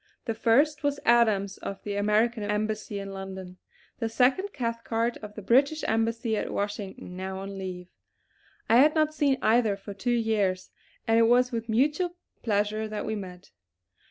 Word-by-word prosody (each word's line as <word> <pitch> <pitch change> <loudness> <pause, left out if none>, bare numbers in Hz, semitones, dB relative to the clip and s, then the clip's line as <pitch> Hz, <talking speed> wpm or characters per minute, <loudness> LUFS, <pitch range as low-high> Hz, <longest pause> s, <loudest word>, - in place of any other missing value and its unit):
The 225 - -1
first 270 +7 +3
was 285 -1 0
Adams 215 -5 +3
of 195 - -6
the 205 -1 -3
American 215 +3 +2
Embassy 210 0 -2
in 195 0 -6
London; 190 -1 -8 0.4
the 225 -2 -1
second 265 - +2
Cathcart 230 -3 -2
of 210 -1 -10
the 210 - -8
British 280 +8 +3
Embassy 225 0 0
at - - -2
Washington, 200 -3 -4
now 190 +1 -5
on 195 +1 -6
leave. 185 -2 -6 0.8
I 230 - +5
had 300 +5 +5
not 310 -1 +2
seen 285 -3 +2
either 220 -2 +3
for 200 +1 -9
two 200 +5 -4
years, 215 -6 0 0.4
and 225 0 +4
it 230 - +5
was 250 +2 +4
with 230 -1 -4
mutual 300 +10 +1 0.3
pleasure 215 0 0
that 215 -1 -4
we - - -2
met. 185 -3 -8
220 Hz, 165 wpm, -27 LUFS, 200-240 Hz, 0.8 s, I